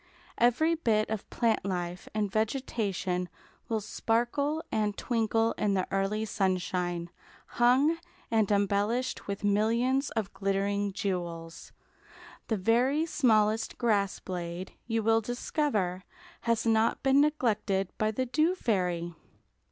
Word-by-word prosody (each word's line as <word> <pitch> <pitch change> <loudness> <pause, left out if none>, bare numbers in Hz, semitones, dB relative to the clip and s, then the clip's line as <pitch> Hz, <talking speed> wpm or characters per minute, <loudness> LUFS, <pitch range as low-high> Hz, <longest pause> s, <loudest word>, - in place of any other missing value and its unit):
Every 245 +8 +3
bit 220 -10 +1
of 220 -3 -4
plant 230 -2 +1
life 180 -2 -3
and 210 -2 0
vegetation 205 -6 -1 0.4
will 220 -2 0
sparkle 240 +8 0
and 210 -2 0
twinkle 225 -1 +1
in 200 -2 +1
the 185 - +1
early 195 +3 0
sunshine, 180 -3 -1 0.3
hung 265 +7 +3 0.3
and 220 -3 +2
embellished 205 +5 0
with 200 +1 -4
millions 230 +7 +2
of 215 -3 -2
glittering 200 +1 0
jewels. 175 -5 -4 0.8
The 220 - 0
very 245 - +2
smallest 220 -8 +2
grass 205 -5 +1
blade, 175 0 -5
you 225 -1 0
will 225 +1 +3
discover, 220 - -1 0.5
has 230 0 +2
not 225 0 +2
been 270 +1 +5
neglected 215 -10 +1
by 215 - +2
the 255 +4 -1
Dew 310 +8 +2
Fairy. 180 - -1
215 Hz, 120 wpm, -29 LUFS, 195-240 Hz, 0.8 s, been